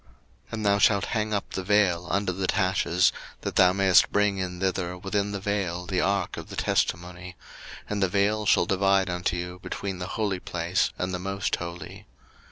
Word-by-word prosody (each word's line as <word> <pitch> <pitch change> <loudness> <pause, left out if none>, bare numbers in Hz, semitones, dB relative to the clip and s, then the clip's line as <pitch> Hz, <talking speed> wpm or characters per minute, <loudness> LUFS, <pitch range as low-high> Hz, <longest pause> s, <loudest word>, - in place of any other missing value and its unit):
02:026:033 60 - -30 0.4
And 110 -1 -3
thou 100 0 +4
shalt 100 -1 +4
hang 110 -2 -2
up 100 -2 -2
the 95 - -4
vail 95 -3 +2
under 100 +1 0
the 95 +1 -2
taches, 95 -2 +2 0.3
that - - -4
thou 90 -1 +6
mayest 95 -3 +4
bring 105 -1 +2
in 90 -1 -4
thither 90 -1 -1
within 100 +2 -2
the 100 - -3
vail 95 -3 -2
the 90 -1 0
ark 100 -2 0
of - - -8
the - - -7
testimony: 90 +1 -2 0.5
and 105 -1 -2
the 95 - +2
vail 105 +2 +1
shall - - +4
divide 95 0 +2
unto 90 0 -1
you 90 +1 -6
between 95 -3 -5
the 90 - -4
holy 100 -4 0
place 85 +1 -1
and 90 +1 -2
the 90 - -2
most 95 +1 -2
holy. 90 +4 -8
95 Hz, 190 wpm, -26 LUFS, 90-100 Hz, 0.5 s, thou